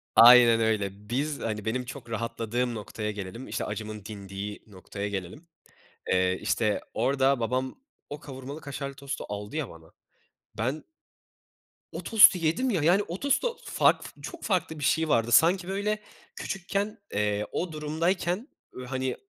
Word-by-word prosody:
Aynen 120 Hz, -1 st, +9 dB
öyle. 105 Hz, -2 st, -1 dB
Biz, 140 Hz, +4 st, -1 dB
hani, 105 Hz, -2 st, -3 dB
benim 125 Hz, +3 st, -1 dB
çok 120 Hz, -, -9 dB
rahatladığım 115 Hz, +2 st, -2 dB
noktaya 105 Hz, 0 st, -4 dB
gelelim, 105 Hz, +5 st, -7 dB
işte, -, -, -3 dB
acımın 105 Hz, -1 st, -6 dB
dindiği 100 Hz, -1 st, -6 dB
noktaya 100 Hz, +1 st, -6 dB
gelelim. 100 Hz, -, -6 dB, 0.7 s
Eee, 95 Hz, 0 st, +2 dB
işte, 105 Hz, +1 st, +1 dB
orada 135 Hz, -1 st, +2 dB
babam 130 Hz, +3 st, -1 dB, 0.4 s
o 145 Hz, 0 st, -6 dB
kavurmalı 135 Hz, +2 st, -8 dB
kaşarlı 140 Hz, -1 st, -5 dB
tostu 140 Hz, 0 st, -5 dB
aldı 105 Hz, +6 st, -5 dB
ya 150 Hz, -6 st, -2 dB
bana, 80 Hz, -1 st, -14 dB, 0.7 s
ben 130 Hz, +8 st, -1 dB, 1.1 s
o -, -, -6 dB
tostu 210 Hz, -4 st, +8 dB
yedim 170 Hz, +11 st, +1 dB
ya. 185 Hz, -10 st, +1 dB
Yani 180 Hz, +6 st, +4 dB
o 175 Hz, +3 st, -5 dB
tostu 465 Hz, -, +1 dB
farklı -, -, +3 dB
f -, -, -18 dB
çok 345 Hz, -, -8 dB
farklı 175 Hz, -6 st, -1 dB
bir -, -, -5 dB
şey 160 Hz, +2 st, +2 dB
vardı 115 Hz, -2 st, +2 dB
sanki 175 Hz, +8 st, +5 dB
böyle 205 Hz, +2 st, -1 dB, 0.4 s
küçükken, 200 Hz, +2 st, -3 dB, 0.2 s
eee, 105 Hz, 0 st, 0 dB
o 175 Hz, -1 st, -2 dB
durumdayken, 170 Hz, -, -1 dB, 0.3 s
ııı, 125 Hz, -, -7 dB
hani, 130 Hz, 0 st, -2 dB
125 Hz, 150 wpm, -27 LUFS, 105-160 Hz, 1.1 s, Aynen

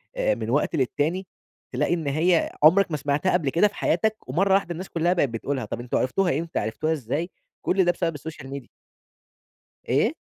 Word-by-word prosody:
آآ -, -, +1 dB
من -, -, -5 dB
وقت -, -, +1 dB
للتاني، 155 Hz, +7 st, 0 dB, 0.4 s
تلاقي -, -, 0 dB
إن 160 Hz, -4 st, -2 dB
هي 160 Hz, +4 st, +2 dB
عمرك 175 Hz, +3 st, +6 dB
ما 150 Hz, -, 0 dB
سمعتها 145 Hz, +6 st, 0 dB
قبل 160 Hz, -6 st, +1 dB
كده 170 Hz, +8 st, +4 dB
في 200 Hz, -, -11 dB
حياتك، 215 Hz, +6 st, +1 dB
ومرة 190 Hz, +9 st, +2 dB
واحدة 195 Hz, -3 st, +2 dB
الناس 180 Hz, +3 st, -6 dB
كُلّها 170 Hz, +2 st, +1 dB
بقت 145 Hz, -7 st, +1 dB
بتقولها، 125 Hz, +2 st, -3 dB
طب 115 Hz, -, -5 dB
أنتم 120 Hz, 0 st, -2 dB
عرفتوها 160 Hz, +3 st, +1 dB
إمتى، 170 Hz, 0 st, -3 dB
عرفتوها 155 Hz, +9 st, -1 dB
إزاي؟ 150 Hz, +5 st, -3 dB, 0.3 s
كل 190 Hz, -1 st, +2 dB
ده 175 Hz, -, +4 dB
بسبب 170 Hz, -3 st, -2 dB
السوشيال 145 Hz, -2 st, -8 dB
ميديا. 135 Hz, -3 st, -7 dB, 1.2 s
إيه؟ -, -, +2 dB
165 Hz, 185 wpm, -25 LUFS, 140-185 Hz, 1.2 s, عمرك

